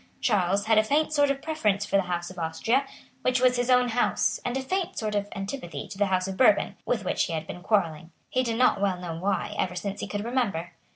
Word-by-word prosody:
Charles 200 -2 +1
had 220 -1 +5
a - - +4
faint 305 +7 +1
sort 290 -1 +3
of 275 0 -2
preference 215 -11 0
for 200 - -2
the 195 - +5
House 175 0 -2
of 180 - -10
Austria, 225 +12 0 0.3
which 255 0 +2
was 250 0 +4
his 245 0 -1
own 250 -1 +4
house, 240 +1 +1
and 245 +1 -1
a 265 - -3
faint 370 +5 -2
sort 215 -1 -2
of 205 -1 0
antipathy 195 -2 -5
to - - -8
the 205 - +3
House 185 0 0
of 190 -1 -5
Bourbon, 215 -5 +4
with 220 -5 0
which - - +1
he 170 - -4
had 160 -1 -3
been 175 - -8
quarrelling, 170 -6 0 0.2
he 255 - 0
did 230 -3 -1
not 250 -5 +3
well 195 -2 +1
know 175 -2 -5
why, 190 +4 -1
ever 180 -1 -1
since 195 +3 -4
he - - -4
could 205 0 -3
remember. 205 -9 -1
205 Hz, 245 wpm, -27 LUFS, 185-250 Hz, 0.3 s, had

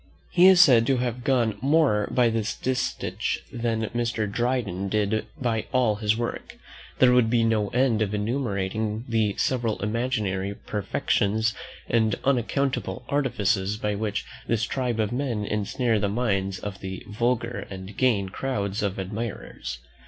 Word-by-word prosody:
He 180 +1 +6
is 190 -2 +7
said 125 -9 +7
to 135 - +3
have 125 0 -2
got 115 -6 +1
more 135 -7 +3
by 125 -2 +3
this 110 -1 -1
distich 125 -6 -2 0.2
than 115 -2 -1
Mr. 115 -2 -1
Dryden 105 -4 -1
did 105 +1 0
by 115 -4 -1
all 125 -5 +2
his 105 0 +1
works. 120 0 -4 0.4
There 125 -1 +6
would 125 -3 +4
be 115 0 +3
no 110 -2 +2
end 125 -2 +2
of 105 -2 0
enumerating 105 -1 -2
the 110 -3 +1
several 115 -6 0
imaginary 105 -4 -1
perfections 105 +2 0 0.3
and 110 -3 +2
unaccountable 135 0 0
artifices 105 -8 +1
by 105 -1 -1
which 105 0 -2 0.2
this 115 -1 +1
tribe 125 -1 -1
of 110 -1 0
men 120 -5 -1
ensnare 110 +3 0
the 100 0 0
minds 100 -4 0
of 95 0 -6
the 95 0 -6
vulgar 115 +3 -1
and 95 +1 -8
gain 110 -7 +2
crowds 100 -2 -2
of 100 -2 -1
admirers. 100 - -5
110 Hz, 145 wpm, -25 LUFS, 105-125 Hz, 0.4 s, is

